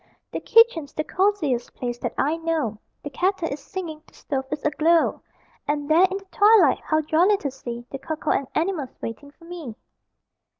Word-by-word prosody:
The - - -3
kitchen's 455 -11 +4
the 310 - -2
cosiest 320 -11 0
place 240 -1 -4
that - - -4
I 300 +3 +1
know: 320 -10 -2 0.2
The 290 - -6
kettle 365 -1 0
is 280 - -5
singing, 320 0 -6
the - - -22
stove 270 -2 -3
is 295 0 -4
aglow, 320 +2 +2 0.5
And 290 0 -1
there 335 +5 +5
in 385 - -2
the 395 - -12
twilight, 410 -8 +5
how 310 0 0
jolly 340 +7 +3
to 280 -7 -4
see 240 -2 -7
The 275 - -5
cocoa 315 0 -3
and 275 - 0
animals 315 -6 -2
waiting 230 +5 -7
for 335 +4 -19
me. 335 -10 -8
310 Hz, 180 wpm, -24 LUFS, 280-355 Hz, 0.5 s, there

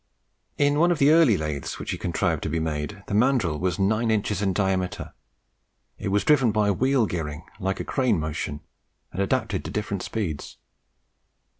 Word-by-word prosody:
In 145 +1 +3
one 170 +2 +5
of 175 - +2
the 145 0 +5
early 155 - +5
lathes 75 -3 -4
which - - -5
he - - -3
contrived - - -1
and 80 -1 -1
made, 80 +6 -4
the - - -6
mandrill 105 - +2
was 90 -1 -1
nine 110 +4 +1
inches 105 -2 0
in 100 -2 +1
diameter; 95 -2 -1 0.9
it 105 - -4
was 100 0 +1
driven 135 -3 +4
by 105 -1 +2
wheel 130 +3 +2
gearing 80 -4 -4 0.2
like 95 -1 -2
a - - -4
crane 125 - +1
motion, 75 -1 -4 0.5
and 95 - -3
adapted 105 -2 0
to - - -6
different 105 -3 -3
speeds. 85 -10 -4
100 Hz, 170 wpm, -25 LUFS, 90-120 Hz, 0.9 s, one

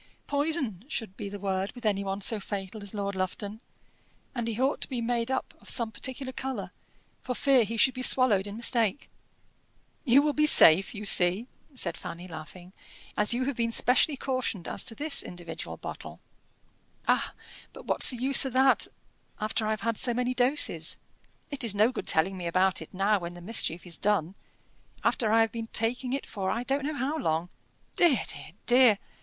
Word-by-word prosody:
"'Poison' 285 - -1
should 225 -9 -5
be 205 -2 -6
the 205 - -7
word 195 0 -2
with 245 -1 -11
any 200 -2 0
one 195 +1 -4
so 215 +2 +2
fatal 200 +1 -6
as 200 +1 -4
Lord 200 -1 -3
Lufton; 200 +3 -4 0.7
and 235 -3 -3
he 230 0 -4
ought 270 +3 0
to - - -4
be 255 -3 -3
made 235 0 -1
up 265 - -3
of - - -12
some 230 -2 +1
particular 260 +2 -2
colour, 265 0 -5 0.5
for 250 - -4
fear 270 -3 +3
he 230 +2 -5
should 260 +3 +4
be 255 - -6
swallowed 230 -7 +4
in 205 - -7
mistake." 230 0 +1 0.9
"You 275 +1 +5
will 300 -1 0
be 300 +1 +2
safe, 190 - +7
you 210 +1 -6
see," 185 +3 +3 0.3
said - - -3
Fanny, 175 +2 -8
laughing, 175 +2 -11 0.4
"as 210 +3 +3
you 255 +1 -1
have 280 -1 -2
been 230 0 -1
specially 255 +5 +4
cautioned 255 -9 -3
as - - 0
to 225 - +2
this 300 +4 +1
individual 175 -2 -8
bottle." - - -9 0.9
"Ah! - - +1 0.4
but - - -13
what's - - +4
the 250 - -4
use 265 +3 +5
of 265 -3 -4
that 265 +1 +3 0.5
after 215 0 -2
I - - -1
have 215 0 -2
had 230 -1 -1
so 240 -2 +2
many 250 +1 -1
doses? 255 +4 +1 0.5
It 275 -2 0
is 220 -4 0
no 215 +4 +3
good - - -6
telling 185 +4 +1
me 175 -2 -5
about 185 +2 +1
it - - -10
now, 200 +2 +1
when 175 0 -7
the - - -10
mischief 175 -3 -1
is 175 -2 -1
done, 195 -4 0 0.7
after 220 -3 +1
I 225 +1 +5
have 225 -1 +1
been 225 -1 -6
taking 245 +3 -1
it 275 +2 -3
for 190 -3 -4
I 235 - -2
don't 275 +2 -1
know 305 +1 -3
how 285 +5 -2
long. 160 - -1 0.4
Dear! 315 - +3
dear! 160 - -5
dear! 245 -4 +5
225 Hz, 195 wpm, -27 LUFS, 195-255 Hz, 0.9 s, safe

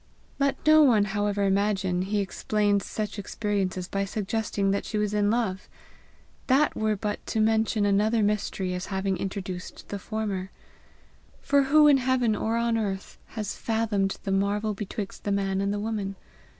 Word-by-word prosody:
Let 275 0 +2
no 310 0 +7
one, 230 -8 +5
however, 205 0 -1
imagine 195 -2 +1
he 200 +2 0
explains 205 +1 0
such 210 -1 -4
experiences 195 -3 -2
by 195 0 -1
suggesting 205 0 -1
that 200 - 0
she 215 - -3
was 210 0 0
in 205 -1 +2
love! 215 -5 -1 0.8
That 280 +3 +3
were 215 -1 +1
but 205 +1 -3
to 220 - -1
mention 220 -1 +2
another 210 +3 +2
mystery 200 -3 -1
as 180 0 -4
having 190 -1 -1
introduced 185 -2 -6
the 200 - -4
former. 200 -3 -3 0.9
For 280 0 +2
who 300 +2 +6
in 285 -2 +7
heaven 250 -4 +1
or 225 +2 -1
on 235 -1 +1
earth 195 -3 -4 0.2
has 210 -2 -3
fathomed 220 -4 0
the 195 - -2
marvel 205 +2 +1
betwixt 205 0 -6
the 205 - -1
man 195 -1 0
and 200 0 0
the 205 - -2
woman? 205 -2 -3
205 Hz, 165 wpm, -26 LUFS, 195-220 Hz, 0.9 s, no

